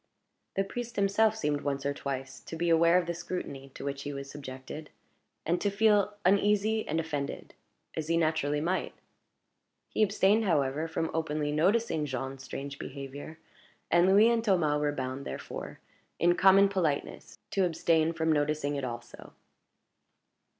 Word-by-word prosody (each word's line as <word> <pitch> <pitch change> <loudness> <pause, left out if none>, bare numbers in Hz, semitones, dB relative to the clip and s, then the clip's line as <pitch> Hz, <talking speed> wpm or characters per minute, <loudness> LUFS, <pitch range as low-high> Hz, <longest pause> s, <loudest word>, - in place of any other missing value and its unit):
The 195 - +2
priest 240 +3 -6
himself 205 +2 +3
seemed 150 -7 -1
once 140 -1 -2
or 140 - +1
twice 135 -1 -5
to - - -6
be 170 +1 0
aware 170 +2 +5
of 180 - +1
the 170 - -2
scrutiny 165 -6 -6
to - - -7
which 140 0 -3
he 145 - -4
was 140 -1 -7
subjected, 140 +2 -8 0.6
and 175 +2 0
to 205 - +2
feel 205 0 +3
uneasy 210 +3 +3
and 160 +2 0
offended, 150 -4 -4 0.4
as 155 -1 -3
he 165 0 +2
naturally 155 -3 +1
might. 180 +4 -1 0.9
He - - -1
abstained, 205 +1 +3
however, 150 -3 +1
from 160 0 -2
openly 150 -2 -1
noticing 165 0 +1
Jean's 135 0 -5
strange 140 +1 -6
behavior; 140 +3 -7 0.5
and 175 +2 +5
Louis 210 +4 +6
and 230 -1 +1
Thomas 165 -8 +2
were 145 0 +1
bound, 130 -1 -4
therefore, - - -7 0.4
in 175 +1 +4
common 195 +2 +6
politeness, 170 -8 -2
to 195 - +2
abstain 165 -1 +2
from 160 -1 0
noticing 145 -1 0
it 140 - -3
also. 120 -1 -7
160 Hz, 155 wpm, -29 LUFS, 140-190 Hz, 0.9 s, Louis